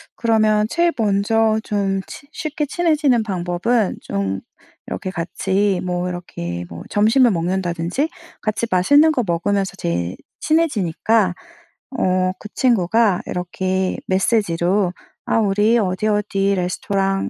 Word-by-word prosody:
그러면 215 -2 +2
제일 340 +4 +2
먼저 220 +1 +2
좀 195 -2 -1
친 285 - -11
쉽게 305 -1 -3
친해지는 300 -6 +2
방법은 190 +3 0
좀 95 -1 -2 0.5
이렇게 185 - -4
같이 190 +2 0
뭐 180 0 -1
이렇게 85 - -5
뭐 85 0 -8
점심을 225 +4 +4
먹는다든지 180 - -1 0.3
같이 215 +2 -1
맛있는 285 - +5
거 255 -6 0
먹으면서 195 +3 -1
제일 85 +1 -2 0.2
친해지니까 220 - +1 0.6
어 185 0 +2
그 210 - -9
친구가 220 -4 +2
이렇게 185 +1 -2
메시지로 190 -2 +1 0.3
"아 - - +1
우리 210 +2 +3
어디 190 +1 -1
어디 200 -1 +1
레스토랑 195 +2 -1
195 Hz, 265 characters per minute, -20 LUFS, 180-225 Hz, 0.6 s, 맛있는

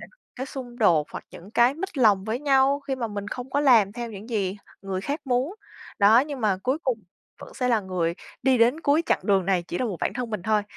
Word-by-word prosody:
sẽ - - -10
có - - -28 0.2
cái 260 +2 -4
xung 245 -3 -8
đột 165 - +4
hoặc - - -7
những 185 +4 -12
cái 240 +4 +4
mếch 345 -3 -6
lòng 205 -5 +4
với 225 +2 -2
nhau 275 0 +3
khi 275 -1 -3
mà 235 -3 -2
mình 205 -1 -5
không 250 +3 -6
có 285 +2 +1
làm 225 -8 +5
theo 235 -1 -5
những 210 +2 -10
gì 200 -3 -1 0.3
người 190 -1 -3
khác 285 +9 -3
muốn. 260 +7 0 0.4
Đó, 215 +4 +6
nhưng 285 -2 -4
mà 205 -4 +2
cuối 260 +4 0
cùng 250 -4 0 0.4
vẫn - - -11
sẽ 250 -1 -1
là 230 -3 +3
người 180 -3 -2 0.3
đi 260 -2 +3
đến 245 +7 +3
cuối 300 +2 +2
chặng - - +2
đường 195 -3 +2
này 185 -3 +2
chỉ 175 - -5
là 255 - 0
một 200 -7 -3
bản - - 0
thân 245 -2 -4
mình 210 -5 -4
thôi. 215 0 +1
235 Hz, 255 wpm, -25 LUFS, 200-265 Hz, 0.4 s, Đó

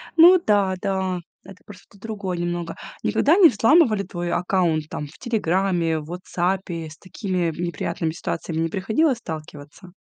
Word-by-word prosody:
Ну 350 +2 +8
да, 200 -3 +2
да, 190 -2 -1 0.2
это 195 0 -13
просто 200 0 -15
другое 200 -4 -4
немного. 175 0 -3 0.3
Никогда 315 +4 +3
не 355 -6 +8
взламывали 225 - +4
твой 175 -2 -4
аккаунт 170 -4 0
там 150 - -4
в 145 - -16
"Телеграме", 185 -7 0
в 150 - -9
"Ватсапе"? 175 0 -3
С 155 - -13
такими 185 -3 -2
неприятными 170 -2 -2
ситуациями 160 0 -4
не 165 - 0
приходилось 220 - +1
сталкиваться? 155 -1 -9
185 Hz, 145 wpm, -23 LUFS, 170-205 Hz, 0.3 s, Ну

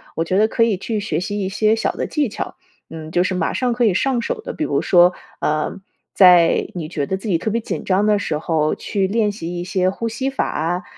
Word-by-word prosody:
我 165 - 0
觉 185 +3 -1
得 215 - +4
可 230 - -2
以 225 -4 +1
去 215 +3 -3
学 180 -7 -2
习 205 +3 -3
一 190 - -2
些 215 +2 +2
小 225 - -1
的 - - -3
技 295 -5 -1
巧， - - -6 0.4
嗯， 160 -1 -8
就 175 +2 +2
是 185 - -1
马 180 -3 -1
上 250 -2 0
可 240 0 +1
以 205 - +3
上 255 +3 +1
手 - - -3
的。 - - -6
比 - - -3
如 - - 0
说， 175 0 +5 0.3
呃， 155 +4 -1 0.3
在 180 -3 +5
你 165 -3 -4
觉 145 -4 -3
得 190 - -1
自 195 - -8
己 180 -5 +2
特 220 - -2
别 230 - 0
紧 225 - -5
张 195 +2 +1
的 210 -1 +3
时 155 -6 -2
候 155 -1 0
去 195 -3 -1
练 210 +1 +1
习 175 -4 -6
一 - - -3
些 185 0 0
呼 230 +4 -4
吸 250 +4 -2
法 270 - -1
啊， 175 +4 -2
190 Hz, 275 characters per minute, -20 LUFS, 175-220 Hz, 0.4 s, 说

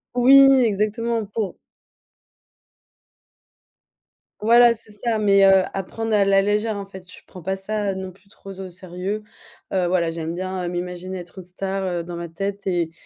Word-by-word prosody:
Oui 270 +2 +7
exactement 220 +2 -1
pour 205 -1 -4 2.8
Voilà 235 +2 +6
c'est 220 -1 -15
ça, 220 +2 -2
mais, 200 -2 +4
heu, 190 -1 +6
à 195 - -2
prendre 225 +3 -4
à 205 - +4
la 195 0 +3
légère 210 +1 0
en 200 - -5
fait. 190 -2 -13
Je - - -13
prends 185 - -12
pas 190 +3 -2
ça, 205 +1 -2
heu, 190 - -5
non 190 0 -6
plus 190 +2 -25
trop 195 - -12
au 190 - -6
sérieux. 185 +4 -5 0.5
Heu, 180 -2 +1
voilà, 175 -2 +1
j'aime 165 0 -4
bien, 185 0 -4
heu, 175 - -2
m'imaginer 180 +1 -5
être 175 +2 -10
une - - -9
star, 190 +2 -4 0.2
heu, - - -8
dans 175 0 -7
ma 170 -1 -6
tête 195 +3 -5
et 175 -3 0
195 Hz, 180 wpm, -22 LUFS, 180-210 Hz, 2.8 s, Oui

